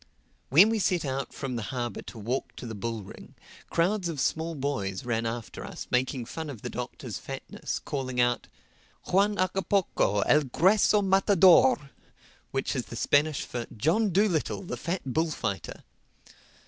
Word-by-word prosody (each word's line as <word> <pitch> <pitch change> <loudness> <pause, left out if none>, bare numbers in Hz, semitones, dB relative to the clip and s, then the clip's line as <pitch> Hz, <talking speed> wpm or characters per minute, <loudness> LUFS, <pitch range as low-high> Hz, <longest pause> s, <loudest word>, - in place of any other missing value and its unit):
When 175 - +7
we 225 -1 +1
set 180 -5 +1
out 135 0 -3
from 130 -2 -5
the - - -3
harbor 120 -2 -3
to - - -10
walk 120 +5 -3
to - - -8
the 115 - -5
bull 110 +1 -4
ring, 95 - -13 0.3
crowds 180 +2 +1
of 155 -4 -4
small 160 +4 -1
boys 130 -7 -3
ran 115 -1 0
after 115 0 -5
us - - -7
making 125 0 0
fun 160 +5 -6
of 120 -7 -8
the - - -4
Doctor's - - -6
fatness, - - -5
calling 130 -4 -4
out, 120 0 +2 0.6
"Juan 200 +3 +3
Hagapoco, 185 - +1
el 150 - +5
grueso 200 - +4
matador!" 185 -7 +5 0.6
which - - -2
is - - -2
the - - -9
Spanish 150 0 +2
for, 120 -2 -5
"John 185 - +2
Dolittle, 190 -2 +1
the 180 - -4
fat 180 +2 -3
bullfighter." 135 -8 -2
145 Hz, 155 wpm, -28 LUFS, 120-185 Hz, 0.6 s, When